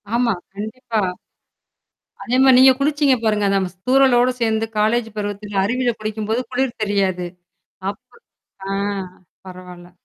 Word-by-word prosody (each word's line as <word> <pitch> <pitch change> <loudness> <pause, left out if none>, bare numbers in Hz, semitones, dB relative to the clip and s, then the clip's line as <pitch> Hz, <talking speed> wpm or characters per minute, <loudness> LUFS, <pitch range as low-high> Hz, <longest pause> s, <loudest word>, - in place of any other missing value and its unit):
ஆமா. 235 -2 +2 0.2
கண்டிப்பா. 220 +2 -3 1.2
அதே 250 +1 0
மாரி 265 -1 +7
நீங்க 260 0 +8
குளிச்சிங்க 290 -1 +2
பாருங்க, 210 -2 +1
நம்ம, 190 -1 +1
ஸ் - - -36
தூரலோடு 255 -2 +4
சேந்து 225 -1 +1
காலேஜ் 225 +2 +2
பருவத்துல 205 -1 -3
அருவில 245 +3 0
குளிக்கும்போது 215 +2 -2
குளிர் 255 -2 -2
தெரியாது. 190 -3 0 0.6
அப்ப 200 - -9 0.6
அ. - - -1 0.7
பரவால்ல. 180 -1 -11
220 Hz, 120 wpm, -20 LUFS, 205-250 Hz, 1.2 s, நீங்க